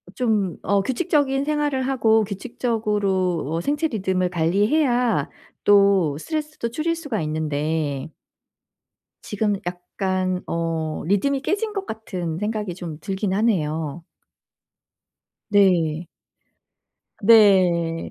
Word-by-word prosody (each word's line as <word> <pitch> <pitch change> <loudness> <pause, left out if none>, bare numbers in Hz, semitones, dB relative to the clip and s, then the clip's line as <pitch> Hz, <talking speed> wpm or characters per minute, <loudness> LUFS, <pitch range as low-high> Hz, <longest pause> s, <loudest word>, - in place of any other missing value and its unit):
좀 215 -8 0
어 200 0 +2
규칙적인 270 - 0
생활을 295 -3 0
하고 225 -5 +3
규칙적으로 200 - -1
어 165 - -1
생체 295 - 0
리듬을 185 -6 -1
관리해야 210 - +1 0.3
또 200 -7 +4
스트레스도 305 - -4
줄일 330 +6 -1
수가 285 - -3
있는데 155 -1 -2 1.1
지금 210 0 -1
약간 185 +1 -2
어 165 -2 -2
리듬이 270 +9 +1
깨진 415 +6 -1
것 395 -2 -4
같은 180 -7 -5
생각이 210 -2 -3
좀 165 -4 -7
들긴 195 0 -2
하네요. 165 -7 -1 1.4
네. 175 -6 +3 1.2
네. 185 -6 +4
200 Hz, 210 characters per minute, -22 LUFS, 170-235 Hz, 1.4 s, 또